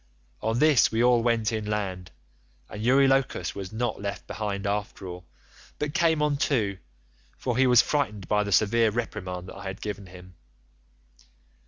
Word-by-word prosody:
"On 110 +1 0
this 150 -2 +5
we 115 +1 +1
all 125 -1 +4
went 115 -2 +1
inland, 105 -5 -3 0.6
and 105 - -8
Eurylochus 135 -6 +2
was 95 -2 -7
not 110 -1 -2
left 100 0 -5
behind 100 -2 -4
after 100 -1 -3
all, 90 -1 -8 0.5
but 150 0 -3
came 165 -3 +2
on 150 -1 +1
too, 110 -10 0 0.6
for 125 -2 -2
he 130 +1 +4
was 125 -2 +6
frightened 105 - -1
by 105 0 +2
the 100 - -4
severe 110 +4 +4
reprimand 95 -5 -4
that - - -10
I 100 - -9
had 95 +1 -5
given 100 -2 -6
him. 90 0 -13
110 Hz, 160 wpm, -26 LUFS, 100-125 Hz, 0.6 s, was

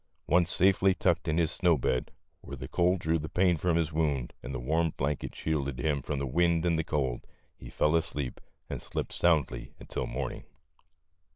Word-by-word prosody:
Once 85 +1 +3
safely 95 0 +4
tucked 85 -2 +1
in 80 0 +1
his 85 -1 +2
snow 85 -4 +3
bed, 65 -1 -1 0.3
where 70 - -8
the 65 0 -6
cold 90 +4 +2
drew 80 0 +1
the 80 - -5
pain 90 -1 +3
from 85 +1 0
his 80 -1 0
wound 75 -6 0
and 65 - -6
the 65 - -3
warm 80 +6 +1
blanket 70 +2 -2
shielded 70 -4 -2
him 70 +2 0
from 75 +2 -3
the 70 - -1
wind 85 +4 +2
and 80 -2 +2
cold, 65 -5 -1 0.3
he - - -11
fell 75 +5 +2
asleep 75 -5 -2 0.3
and - - -5
slept - - -4
soundly 80 -6 +1
until - - -4
morning. 65 0 -4
80 Hz, 185 wpm, -29 LUFS, 70-85 Hz, 0.3 s, safely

